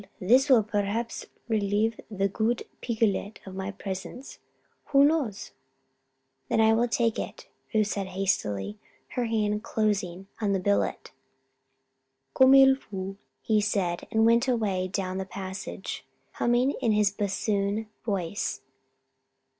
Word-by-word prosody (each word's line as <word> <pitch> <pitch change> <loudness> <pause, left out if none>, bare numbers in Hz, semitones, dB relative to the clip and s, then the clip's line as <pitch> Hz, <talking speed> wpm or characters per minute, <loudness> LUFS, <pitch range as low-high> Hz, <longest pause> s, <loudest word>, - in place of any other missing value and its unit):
this 255 +9 +4
will 245 -5 +6
perhaps 210 +2 -2 0.2
relieve 215 0 +1
the 195 -2 0
good 220 +4 -1 0.2
Picolet 220 -3 -1
of 190 - -8
my 190 +1 -4
presence 195 +5 -7 0.5
who 280 0 +5
knows?" 285 -10 0 1.0
"Then - - +2
I 220 0 +5
will 235 +2 +2
take 230 -1 +1
it," - - -6 0.2
Ruth 215 -2 +3
said, 200 -1 -3
hastily, 185 - -1 0.3
her 250 -2 -1
hand 210 -2 0
closing 195 -5 -1 0.2
on 205 -2 +1
the 195 - +1
billet. 100 - 0 1.2
"Comme 260 +1 +7
il 270 0 +7
faut," 195 -5 -6 0.3
he 215 -1 +2
said, 195 -4 -1
and 220 0 +3
went 235 +3 +4
away 205 -7 0
down 185 0 -3
the - - -1
passage, 190 0 -6 0.3
humming 240 +3 +2
in 225 - +2
his 210 -1 +3
bassoon 200 +1 -1 0.2
voice. 200 - -2
210 Hz, 130 wpm, -27 LUFS, 195-230 Hz, 1.2 s, Comme